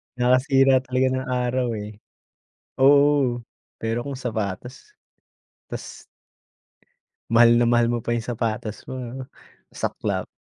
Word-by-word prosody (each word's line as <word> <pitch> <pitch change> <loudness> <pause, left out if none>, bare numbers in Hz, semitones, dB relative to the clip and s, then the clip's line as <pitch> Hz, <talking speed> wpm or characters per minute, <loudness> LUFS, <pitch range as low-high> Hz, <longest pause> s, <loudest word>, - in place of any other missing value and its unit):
Nakakasira 130 +2 +4
talaga 130 0 0
ng 130 0 -2 0.2
araw 125 0 0
eh, 105 0 -8 0.8
oo, 140 -3 +4 0.4
pero 115 +3 -2
kung 140 - -4
sapatos, 125 - -5 0.7
tas - - -8 1.3
mahal 120 0 +6
na 120 - +3
mahal 120 0 +3
mo 120 - -1
pa 120 +1 -2
yung 115 - -2
sapatos 110 -2 -4
mo - - -6 0.3
oh, - - -12 0.5
saklap. - - -3
125 Hz, 115 wpm, -23 LUFS, 115-130 Hz, 1.3 s, mahal